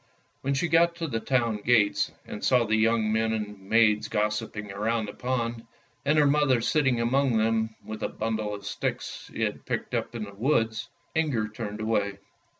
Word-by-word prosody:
When 140 +1 0
she 155 +6 +1
got 170 +1 +4
to 165 0 -3
the 115 -6 -2
town 120 -3 +1
gates, 105 -1 +2
and 105 - -7
saw 125 -2 +4
the 110 0 +1
young 110 0 +2
men 110 0 +1
and 105 -2 -4
maids 110 -2 +4
gossiping 105 0 -2
round 110 +3 -1
the 100 - -7
pond, 120 -2 -2 0.4
and 150 +2 +2
her 150 - +6
mother 140 -3 +3
sitting 135 0 +2
among 125 +1 +2
them 110 0 +1
with 110 0 -6
a - - -1
bundle 110 -1 -2
of 100 0 -10
sticks - - -4
she - - -2
had - - -3
picked - - -3
up 120 - -2
in 115 - -3
the 100 -1 -8
woods, 115 0 0 0.2
Inger 145 -10 +1
turned 105 -1 -6
away. 105 -3 0
115 Hz, 185 wpm, -27 LUFS, 105-130 Hz, 0.4 s, her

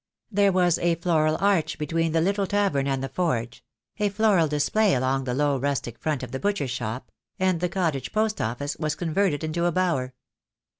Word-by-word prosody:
There 200 -1 +3
was 180 -2 +2
a 170 -1 +2
floral 160 -2 +1
arch 195 -5 +1
between 165 +2 -1
the 165 0 +2
little 195 +3 +1
tavern 195 -10 +1
and 135 -1 -1
the 135 - -3
forge 120 -10 -2 0.2
— - - -38
a 210 -1 +2
floral 200 -5 +3
display 150 +7 +2
along 130 +1 0
the 125 -1 -2
low 145 -1 +1
rustic 135 -4 -2
front 150 -4 -2
of 125 - -7
the 130 - -4
butcher's 200 -10 -1
shop 120 0 -5
— - - -50
and 185 -2 +2
the 180 +1 0
cottage 165 -9 -1
post 215 0 0
office 125 +6 -3
was 155 -1 -1
con 165 -3 -4
verted 180 -5 +1
into 165 +2 -1
a 175 - +2
bower. 160 -9 0
160 Hz, 205 wpm, -25 LUFS, 135-185 Hz, 0.2 s, There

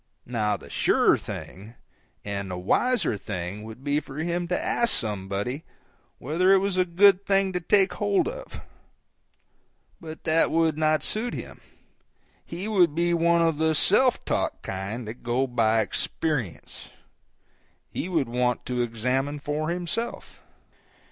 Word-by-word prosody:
Now 105 -4 -1
the - - -14
surer - - +3
thing 105 +5 -8 0.5
and 100 -1 -4
the 90 - -4
wiser 220 - +1
thing 95 +1 -5
would 110 +4 -10
be 145 +1 +1
for 140 -2 -11
him 170 +2 -2
to 180 - -1
ask 235 -2 +3
somebody 105 +6 -3 0.5
whether 170 +8 +1
it - - +7
was 195 0 0
a 185 0 +3
good 190 +2 +5
thing 195 -1 +1
to 180 - 0
take 195 +2 +2
hold 205 - +1
of. - - -7 1.4
But 160 -1 -9
that 160 0 +2
would 165 -1 +2
not 155 0 +1
suit 235 +3 -1
him; - - -8 0.8
he 175 +5 -6
would 180 -8 +3
be 175 +1 +1
one 170 0 +3
of 165 -2 +1
the 160 0 +2
self 245 - +4
taught - - -2
kind 100 +5 -5
that 110 +3 -8
go 120 +3 0
by 115 -3 +2
experience; 120 - -3 1.0
he 180 - -5
would 160 -8 0
want 125 +1 -1
to 125 -1 -1
examine 125 +5 -1
for 150 +2 -3
himself. 180 +7 -4
155 Hz, 145 wpm, -25 LUFS, 115-180 Hz, 1.4 s, it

